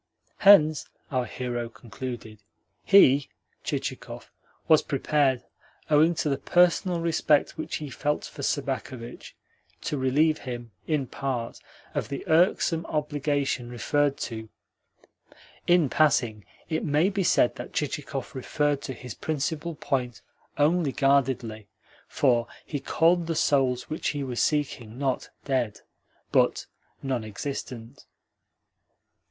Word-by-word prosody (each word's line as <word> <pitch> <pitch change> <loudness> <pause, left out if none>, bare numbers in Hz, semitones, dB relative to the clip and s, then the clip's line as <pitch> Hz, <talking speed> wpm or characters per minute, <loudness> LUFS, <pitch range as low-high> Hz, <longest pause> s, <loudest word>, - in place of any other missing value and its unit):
Hence 155 -7 +6 0.2
(our 130 -2 0
hero 120 0 -4
concluded) 115 -2 -8 0.4
he 145 -8 +6 0.3
(Chichikov) - - -5 0.4
was 155 -1 +6
prepared, 140 -2 +1 0.5
owing 155 +3 +5
to 155 - -1
the 135 -1 0
personal 175 +3 +3
respect 165 -3 +2
which 160 - -4
he 150 -3 -5
felt 150 +4 -1
for - - -9
Sobakevitch, 120 -1 -4 0.5
to 145 - -2
relieve 150 +4 +2
him, 120 -3 -7 0.2
in 150 -4 +1
part, 125 -3 -4 0.3
of - - -2
the 140 - -5
irksome 165 0 +3
obligation 145 -4 -1
referred 140 +4 0
to 110 -1 -7 1.2
(in 175 -4 +5
passing, 120 -8 +2 0.2
it 160 -1 -1
may 155 +5 +2
be 200 -1 -1
said 125 - +3
that - - -7
Chichikov 140 -2 -3
referred 145 +2 0
to 130 - -5
his 125 -2 -8
principal 160 - -3
point 125 -5 -2 0.3
only 155 0 +3
guardedly, 130 -6 +1 0.4
for 120 -4 +2 0.2
he 145 - -3
called 165 +4 +2
the 165 - -1
souls 130 -4 +2
which 155 - -3
he 145 -2 -1
was 125 -3 -2
seeking 130 -7 -1
not 135 -2 -1 0.2
"dead," 125 -7 -1 0.5
but - - +2 0.4
"non 130 -4 -1
existent"). 120 +2 -7
140 Hz, 120 wpm, -26 LUFS, 125-155 Hz, 1.2 s, Hence